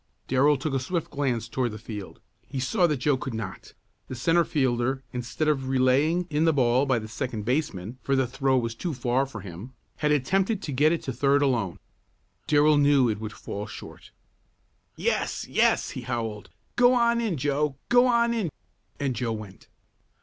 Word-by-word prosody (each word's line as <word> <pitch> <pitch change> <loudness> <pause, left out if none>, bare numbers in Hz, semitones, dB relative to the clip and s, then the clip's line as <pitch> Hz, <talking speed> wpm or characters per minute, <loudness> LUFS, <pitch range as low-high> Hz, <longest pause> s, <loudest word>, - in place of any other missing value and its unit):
Darrell 140 +3 +3
took 140 +2 -3
a 135 - +1
swift 165 +6 -3
glance 125 -6 -1
toward 120 +2 -1
the 105 - -7
field. 105 -3 -8 0.3
He 135 - -4
saw 175 - +2
what 150 -3 0
Joe 140 +1 +1
could 130 -2 -5
not. 110 -1 -7 0.3
The 130 - -6
centre 165 +8 +3
fielder 130 -2 0
instead 125 +5 -2
of 135 -3 0
relaying 135 +7 +2
in 150 +2 +2
the 160 - +4
ball 130 0 +3
by 130 -2 +2
the 110 -1 -5
second 115 -2 -4
baseman 125 - -2
(for 135 - 0
the 130 -1 +2
throw 135 +1 +1
was 115 -2 -1
too 160 +6 -4
far 125 +2 0
for 135 - -8
him), 100 +7 -9 0.2
had 150 -1 +1
attempted 190 - +1
to 150 - -4
get 145 +4 +3
it 170 - -1
to 130 - -3
third 140 +3 +3
alone. 115 -10 0 0.7
Darrell 150 0 +5
knew 140 -4 +4
it 105 -1 -2
would 110 -1 -5
fall 105 +2 -6
short. - - -11 0.9
"Yes! - - -1
Yes!" - - +2
he - - -6
howled. 115 -4 -4 0.3
"Go 245 +1 +5
on 235 -1 +3
in, 210 -8 -1
Joe! 145 +1 0
Go 245 +1 +6
on 235 -1 +3
in!" 215 -7 -1 0.5
And 135 -3 -1
Joe 115 0 -1
went. 105 -3 -9
135 Hz, 185 wpm, -26 LUFS, 120-150 Hz, 0.9 s, Go